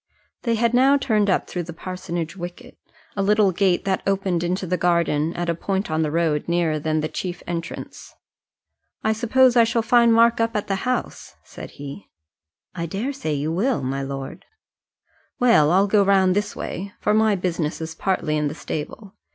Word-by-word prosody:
They 230 -2 0
had 235 +1 +1
now 265 +3 +5
turned 215 -7 +1
up 185 - +1
through 180 - -4
the 170 0 -7
parsonage 170 -1 -5
wicket, 175 -1 -9 0.4
a 200 - -1
little 205 0 +3
gate 185 0 +1
that 190 -1 0
opened 190 -3 0
into 185 +2 -1
the 180 +1 0
garden 170 -3 +1
at 175 0 -3
a 170 - +1
point 190 +2 -3
on 155 0 +1
the 155 - 0
road 155 -2 0
nearer 170 -3 +1
than 155 +1 -1
the 155 - -1
chief 175 +2 -5
entrance. 170 -1 -6 0.9
"I 220 - +2
suppose 245 +3 +3
I 235 - +7
shall 230 0 0
find 235 0 +4
Mark 230 0 +4
up 230 0 0
at 210 - -1
the 195 +5 -2
house?" 255 - -3
said - - -10
he. 145 +7 -9 0.6
"I 170 -2 -4
daresay 205 - -3
you 145 +3 -2
will, 220 - 0
my 135 +2 -2
lord." 135 0 -6 0.9
"Well, 230 -12 +4
I'll 190 +4 +4
go 205 0 +3
round 190 -2 +3
this 205 0 -1
way, 195 +3 -6
for 210 - +1
my 215 -1 +3
business 170 -4 -2
is 160 0 -5
partly 165 -6 -1
in 150 -1 0
the 145 - -5
stable. 190 +7 -6
185 Hz, 185 wpm, -22 LUFS, 165-215 Hz, 0.9 s, I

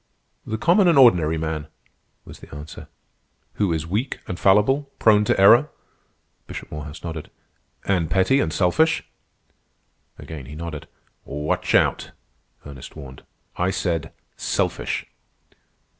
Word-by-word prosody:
"The 110 - -2
common 180 - +4
and 165 -4 +4
ordinary 85 - +5
man," 80 -1 -3 0.6
was - - -12
the - - -15
answer. 75 +1 -10 0.7
"Who 100 -4 +2
is 80 -1 -2
weak 105 +10 -2
and 90 - -5
fallible, 135 +9 +3
prone 105 -1 +4
to - - +1
error?" 120 +9 +7 0.8
Bishop - - -8
Morehouse 75 0 -8
nodded. 80 -3 -6 0.6
"And 90 -5 0
petty 95 +8 +3
and 80 - 0
selfish?" 100 - +2 1.1
Again 75 -5 -9
he 75 - -9
nodded. 80 -2 -7 0.4
"Watch 75 +2 -2
out!" - - +1 0.5
Ernest 70 -3 -10
warned. 70 -4 -10 0.4
"I 90 +1 +1
said 85 -5 -2 0.3
'selfish. - - -2
85 Hz, 125 wpm, -22 LUFS, 75-105 Hz, 1.1 s, error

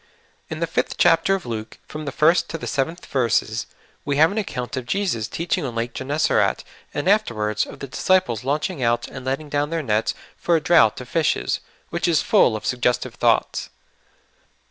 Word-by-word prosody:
IN - - -5
the - - +3
5th - - -1
chapter 195 - +4
of 190 - -6
Luke, 115 -2 -5
from 155 0 -7
the 140 - -3
first 165 +6 +3
to 165 - -4
the - - -7
sev 135 -2 0
enth 170 +2 -10
verses, 120 -5 0 0.4
we 140 0 -1
have 160 +4 +5
an 215 - -1
account 125 - -4
of 130 -2 -5
Jesus 165 - -1
teaching 170 - -2
on 125 -4 -4
Eake 115 +1 -2
Gennesaret, 145 +3 +1 0.3
and 145 +4 -3
afterwards 110 - +1
of - - -11
the 140 - -5
disciples 130 - +1
launching 150 +3 -1
out 120 -1 +1
and 130 - -9
letting 135 +4 -2
down 145 0 -1
their 165 -1 -2
nets 110 -3 0 0.2
for 170 - +1
a - - +3
draught 145 -9 +4
of 125 - -9
fishes, 165 -3 +1 0.3
which 170 +1 -1
is 165 -3 +3
full 110 - +4
of 110 - -6
suggestive 125 -1 0
thoughts. - - +1
140 Hz, 190 wpm, -22 LUFS, 120-165 Hz, 0.4 s, have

